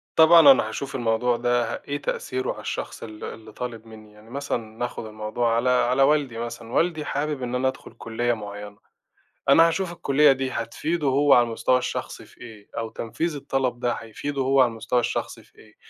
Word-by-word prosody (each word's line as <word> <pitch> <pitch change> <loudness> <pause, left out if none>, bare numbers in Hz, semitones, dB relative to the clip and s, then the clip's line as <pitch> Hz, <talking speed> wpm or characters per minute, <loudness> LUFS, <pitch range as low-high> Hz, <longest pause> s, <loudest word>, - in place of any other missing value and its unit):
طبعًا 160 -3 +8
أنا 110 -4 +3
هاشوف 135 +4 -5
الموضوع 120 0 +1
ده 120 -1 0
إيه 145 0 -3
تأثيره 130 0 -2
على - - -10
الشخص - - -5
ال 110 -1 -9
اللي 110 -1 -8
طالب 115 -1 -6
منّي. 110 -1 -13
يعني 105 +2 -17
مثلًا، 140 0 -2 0.2
نأخد 120 -2 -4
الموضوع 110 +2 -1
على 125 +2 +1
على 125 +2 +3
والدي 140 -5 +2
مثلًا، 115 0 -6
والدي 165 -3 +1
حابب 145 -2 -2
إن 125 +1 -3
أنا 130 +1 +1
أدخل 130 - -5
كلية 120 +1 -1
معيَّنة. 105 -1 -8 0.7
أنا 165 +4 +7
هاشوف 170 +1 -1
الكلية 150 -4 +4
دي 130 0 -1
هتفيده 150 +7 -2
هو 140 +2 +4
على 120 - +6
المستوى 120 +2 +1
الشخصي 125 - -5
في - - -21
إيه، 110 -4 -12
أو 115 -1 -3
تنفيذ 150 +10 -3
الطلب 130 -3 -2
ده 120 -1 0
هيفيده 135 +5 -5
هو 135 0 +4
على 125 - +4
المستوى 115 +2 -1
الشخصي - - -3
في - - -28
إيه، 105 -1 -19
125 Hz, 190 wpm, -24 LUFS, 115-140 Hz, 0.7 s, طبعًا